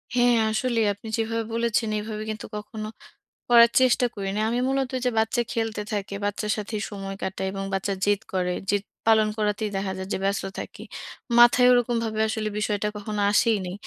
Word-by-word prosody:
হ্যাঁ 245 Hz, -1 st, +4 dB
আসলেই 230 Hz, 0 st, +1 dB
আপনি 205 Hz, +3 st, -12 dB
যেভাবে 225 Hz, 0 st, -1 dB
বলেছেন, 230 Hz, -1 st, +1 dB
এভাবে 215 Hz, 0 st, -5 dB
কিন্তু 215 Hz, -1 st, -5 dB
কখনো 215 Hz, 0 st, -6 dB, 0.6 s
করার 235 Hz, -1 st, +7 dB
চেষ্টা 255 Hz, -1 st, +4 dB
করি 200 Hz, -2 st, -4 dB
নাই। 215 Hz, -, 0 dB
আমি 240 Hz, -, 0 dB
মূলত 270 Hz, -1 st, 0 dB
ওইযে 250 Hz, -1 st, 0 dB
বাচ্চা 220 Hz, +2 st, +1 dB
খেলতে 225 Hz, -2 st, -2 dB
থাকে, 200 Hz, -1 st, -3 dB
বাচ্চার 210 Hz, +1 st, -1 dB
সাথেই 210 Hz, 0 st, -4 dB
সময় 195 Hz, -1 st, -6 dB
কাটাই, 190 Hz, 0 st, -3 dB
এবং 195 Hz, 0 st, -4 dB
বাচ্চা 195 Hz, +1 st, -1 dB
জেদ 205 Hz, 0 st, +2 dB
করে। 180 Hz, -1 st, 0 dB, 0.2 s
জেদ 205 Hz, -1 st, +1 dB, 0.2 s
পালন 220 Hz, -1 st, +5 dB
করাতেই 210 Hz, 0 st, 0 dB
দেখা 195 Hz, 0 st, -2 dB
যায় 190 Hz, 0 st, -5 dB
যে -, -, 0 dB
ব্যস্ত 200 Hz, 0 st, 0 dB, 0.2 s
থাকি। -, -, -8 dB, 0.6 s
মাথায় 240 Hz, +1 st, +7 dB
ওইরকমভাবে 230 Hz, -3 st, 0 dB
আসলে 215 Hz, -1 st, -2 dB
বিষয়টা 210 Hz, -1 st, 0 dB
কখনো 210 Hz, 0 st, -3 dB
আসেইনি। 205 Hz, -4 st, +2 dB
215 Hz, 175 wpm, -25 LUFS, 205-230 Hz, 0.6 s, করার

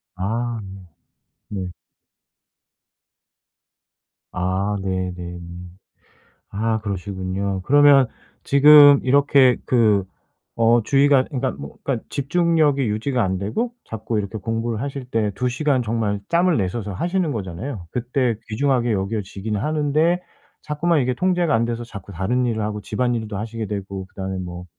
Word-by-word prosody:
아. 115 Hz, +5 st, -2 dB, 0.9 s
네. 95 Hz, -3 st, -4 dB, 2.6 s
아 95 Hz, +3 st, -1 dB
네네네. 90 Hz, -2 st, -4 dB, 1.1 s
아 110 Hz, +2 st, -1 dB
그러시군요. 95 Hz, -1 st, -3 dB
그러면 145 Hz, -2 st, +6 dB, 0.4 s
지금 145 Hz, 0 st, +8 dB
이렇게 135 Hz, -1 st, +4 dB
그 110 Hz, -5 st, +3 dB, 0.6 s
어 115 Hz, 0 st, +4 dB
주의가 140 Hz, +1 st, +4 dB
그러니까 130 Hz, -3 st, -2 dB
뭐 70 Hz, +1 st, -10 dB
그러니까 130 Hz, -5 st, -2 dB
집중력이 155 Hz, -1 st, +1 dB
유지가 120 Hz, +4 st, 0 dB
안 95 Hz, -1 st, -1 dB
되고 165 Hz, -, -2 dB
자꾸 110 Hz, 0 st, -3 dB
이렇게 100 Hz, +2 st, -4 dB
공부를 115 Hz, +2 st, -3 dB
하실 140 Hz, -2 st, -5 dB
때 110 Hz, -4 st, -1 dB
2 125 Hz, +6 st, -1 dB
시간 130 Hz, +1 st, +1 dB
정말 110 Hz, -3 st, -1 dB
짬을 175 Hz, 0 st, +2 dB
내셔서 100 Hz, +1 st, -2 dB
하시는 175 Hz, -, -1 dB
거잖아요. 95 Hz, -1 st, -5 dB
그때 125 Hz, 0 st, 0 dB
귀중하게 120 Hz, +1 st, +1 dB
여겨지긴 100 Hz, +1 st, -3 dB
하는데 155 Hz, -, +1 dB, 0.4 s
자꾸만 155 Hz, +2 st, 0 dB
이게 125 Hz, 0 st, 0 dB
통제가 175 Hz, 0 st, +1 dB
안 115 Hz, -, +2 dB
돼서 120 Hz, 0 st, -3 dB
자꾸 100 Hz, -4 st, -10 dB
다른 110 Hz, +8 st, 0 dB
일을 115 Hz, -2 st, -1 dB
하고 105 Hz, 0 st, -3 dB
집안일도 115 Hz, -4 st, -2 dB
하시게 110 Hz, +1 st, -5 dB
되고 100 Hz, -2 st, -5 dB
그다음에 95 Hz, 0 st, -5 dB
뭐 90 Hz, -1 st, -7 dB
115 Hz, 285 characters per minute, -21 LUFS, 100-140 Hz, 2.6 s, 지금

